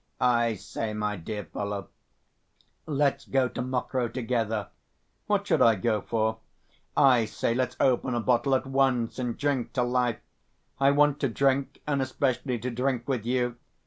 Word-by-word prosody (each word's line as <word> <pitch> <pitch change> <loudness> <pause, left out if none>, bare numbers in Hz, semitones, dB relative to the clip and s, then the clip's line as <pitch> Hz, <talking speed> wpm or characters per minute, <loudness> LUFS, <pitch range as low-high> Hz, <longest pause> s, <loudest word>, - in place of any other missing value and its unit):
"I 120 -2 +3
say, 105 +3 -5
my 105 0 -1
dear 105 +3 -5
fellow, 100 +3 -5 1.0
let's 145 -2 +1
go 130 -1 +2
to - - -5
Mokroe 125 0 -1
together." 115 -4 -1 0.6
"What - - +1
should - - +2
I 115 -1 +6
go 105 +1 0
for?" 110 +1 -1 0.6
"I 125 -5 +5
say, 115 +1 -1
let's 125 0 -1
open 130 -1 +2
a - - +1
bottle 125 +3 +2
at 130 - 0
once, 130 -3 +1
and 125 -2 -2
drink 130 -5 -1
to 125 - +1
life! 120 -1 +1 0.6
I 135 0 +5
want 145 0 +3
to 140 - +1
drink, 135 +3 0
and 145 -2 0
especially 130 -1 -1
to 125 +3 -4
drink 125 0 -1
with 125 -5 -2
you. 125 -1 0
125 Hz, 160 wpm, -27 LUFS, 115-135 Hz, 1.0 s, I